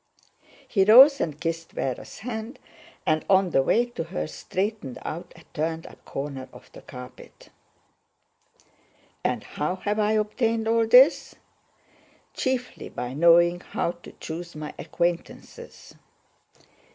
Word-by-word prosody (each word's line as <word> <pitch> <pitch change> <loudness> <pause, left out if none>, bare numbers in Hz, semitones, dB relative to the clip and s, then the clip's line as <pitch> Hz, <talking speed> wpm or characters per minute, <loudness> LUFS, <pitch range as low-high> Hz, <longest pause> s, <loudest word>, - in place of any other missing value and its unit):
(He 195 -4 +3
rose 260 +7 +8
and 150 -2 -3
kissed 165 0 -4
Véra's 130 -2 -4
hand, 225 +2 -6 0.5
and 155 -3 +1
on 190 -2 +4
the 135 - +4
way 230 - +2
to 240 -9 -6
her 75 - -4
straightened 150 - -4
out 165 +3 -6
a 165 - -16
turned 160 +1 -2
up - - -14
corner 135 -2 -6
of - - -16
the - - -13
carpet.) 125 0 -12 1.7
"And - - -1
how 155 +5 -3
have 205 +3 -2
I 210 0 +2
obtained 220 +1 0
all 225 0 +2
this? 255 +6 +5 1.0
Chiefly 260 -1 -3
by 125 +1 -5
knowing 170 +3 +5
how 170 - -2
to 175 0 -14
choose 170 +1 -7
my 150 0 -6
aquaintances. 175 - -4
175 Hz, 125 wpm, -25 LUFS, 155-220 Hz, 1.7 s, rose